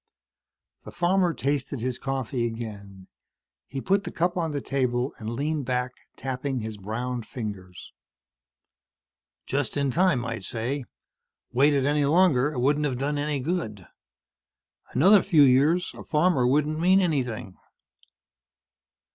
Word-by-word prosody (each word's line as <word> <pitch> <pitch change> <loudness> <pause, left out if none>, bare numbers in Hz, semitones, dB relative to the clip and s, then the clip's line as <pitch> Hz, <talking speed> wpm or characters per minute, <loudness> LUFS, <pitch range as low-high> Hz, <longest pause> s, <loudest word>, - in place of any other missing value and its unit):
The - - -10
farmer 180 0 +2
tasted 140 -4 -2
his 125 +1 -2
coffee 130 -3 -2
again. 100 -4 -8 0.6
He 135 - -5
put 195 +5 +1
the - - -5
cup 175 +1 0
on 170 -3 -1
the 145 -2 -2
table 130 -1 -1
and 110 -1 -5
leaned 145 +4 -2
back, 125 0 -1 0.3
tapping 130 0 -3
his 110 -1 -6
browned 115 +3 -4
fingers. 100 -7 -7 1.5
"Just 145 +1 -2
in 140 -2 +1
time, 170 -7 +2
I'd 115 -3 -4
say. 125 +7 -3 0.7
Waited 140 +2 +3
any 145 0 +2
longer, 150 -3 +3
it 135 - -4
wouldn't 145 +4 +2
have 130 -4 -1
done 145 +2 -1
any 145 -1 -1
good. 125 - -3 1.0
Another 190 +9 +5
few 155 -4 +5
years, 145 +7 +3
a - - -10
farmer 150 -5 +2
wouldn't 150 +3 +1
mean 185 +3 +5
anything." 125 - -2
135 Hz, 130 wpm, -26 LUFS, 120-150 Hz, 1.5 s, Another